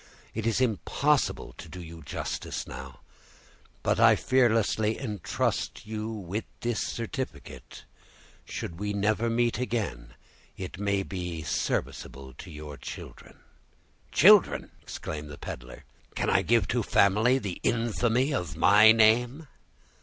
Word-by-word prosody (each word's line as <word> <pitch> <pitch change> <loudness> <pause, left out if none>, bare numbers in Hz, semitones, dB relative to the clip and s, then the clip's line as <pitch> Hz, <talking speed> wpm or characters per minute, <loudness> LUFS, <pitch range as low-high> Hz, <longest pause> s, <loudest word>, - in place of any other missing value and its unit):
It 110 +1 -2
is 115 - +1
impossible 130 +4 +1
to 80 - -9
do 90 - -9
you 85 -1 -10
justice 70 - -4
now, 65 -2 -9 0.8
but - - +1
I - - +7
fearlessly 115 -3 +2
intrust 105 - -2
you 110 0 -4
with 105 -1 -4 0.2
this 120 -2 -1
certificate; 115 - -5 0.6
should 85 +1 -6
we 105 0 -2
never 110 +3 +1
meet 120 0 +1
again, 100 - -3 0.4
it 95 0 -7
may 100 -1 0
be 90 -4 -5
serviceable 65 -2 -3
to 95 - -9
your 75 -2 -8
children." - - -10 0.7
"Children!" - - +5
exclaimed 75 -1 -6
the 75 - -9
peddler, - - -8 0.3
"can - - 0
I - - +4
give 115 -4 +2
to 120 - +1
a - - +1
family 110 +5 +3
the 100 -9 -4
infamy 120 +4 +1
of 90 - -3
my 110 +2 +7
name?" 120 +7 +3
105 Hz, 130 wpm, -28 LUFS, 85-115 Hz, 0.8 s, I